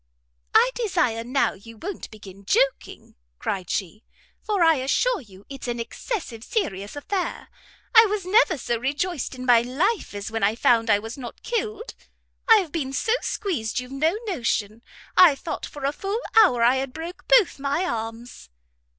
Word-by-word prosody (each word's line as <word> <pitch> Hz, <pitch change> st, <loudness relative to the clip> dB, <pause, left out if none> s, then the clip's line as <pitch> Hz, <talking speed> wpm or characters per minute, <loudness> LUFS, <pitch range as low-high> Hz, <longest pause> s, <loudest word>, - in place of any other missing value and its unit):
"I 475 Hz, +3 st, +6 dB
desire, 350 Hz, -, 0 dB
now, 255 Hz, +4 st, +1 dB
you 225 Hz, +4 st, -14 dB
won't 375 Hz, -, -6 dB
begin 200 Hz, -2 st, -13 dB
joking," -, -, 0 dB, 0.2 s
cried 185 Hz, -, -4 dB
she, 200 Hz, +3 st, -3 dB, 0.4 s
"for 410 Hz, -5 st, +1 dB
I 325 Hz, -2 st, +5 dB
assure 395 Hz, -, +1 dB
you 195 Hz, -4 st, -17 dB
it's 275 Hz, -2 st, -8 dB
an 240 Hz, -1 st, -3 dB
excessive 235 Hz, -, -5 dB
serious 205 Hz, -, -3 dB
affair. 360 Hz, +6 st, -3 dB, 0.4 s
I 450 Hz, -1 st, +8 dB
was 410 Hz, -2 st, -2 dB
never 390 Hz, -3 st, +4 dB
so 235 Hz, -2 st, -2 dB
rejoiced 285 Hz, +3 st, -2 dB
in 255 Hz, 0 st, -7 dB
my 240 Hz, -2 st, +6 dB
life 300 Hz, -, -1 dB
as 205 Hz, +2 st, -5 dB
when 225 Hz, 0 st, -3 dB
I 205 Hz, +2 st, +2 dB
found 230 Hz, -1 st, +3 dB
I 205 Hz, -, +5 dB
was 225 Hz, +5 st, -8 dB
not 245 Hz, -2 st, -9 dB
killed. 450 Hz, -1 st, -3 dB, 0.6 s
I've 405 Hz, -8 st, +5 dB
been 275 Hz, -5 st, -3 dB
so 440 Hz, -, +1 dB
squeezed 250 Hz, -, -2 dB
you've 250 Hz, +1 st, -8 dB
no 315 Hz, +8 st, +1 dB
notion. 230 Hz, -, -2 dB, 0.3 s
I 345 Hz, -6 st, +7 dB
thought 320 Hz, -, -5 dB
for 290 Hz, -2 st, -7 dB
a 280 Hz, -, +2 dB
full 395 Hz, +8 st, -3 dB, 0.2 s
hour 370 Hz, -, +6 dB
I 245 Hz, +3 st, +4 dB
had 265 Hz, -1 st, -3 dB
broke 330 Hz, +3 st, -8 dB
both 480 Hz, -, +4 dB
my 285 Hz, +6 st, 0 dB
arms." 225 Hz, -, -6 dB
275 Hz, 165 wpm, -24 LUFS, -, 0.6 s, I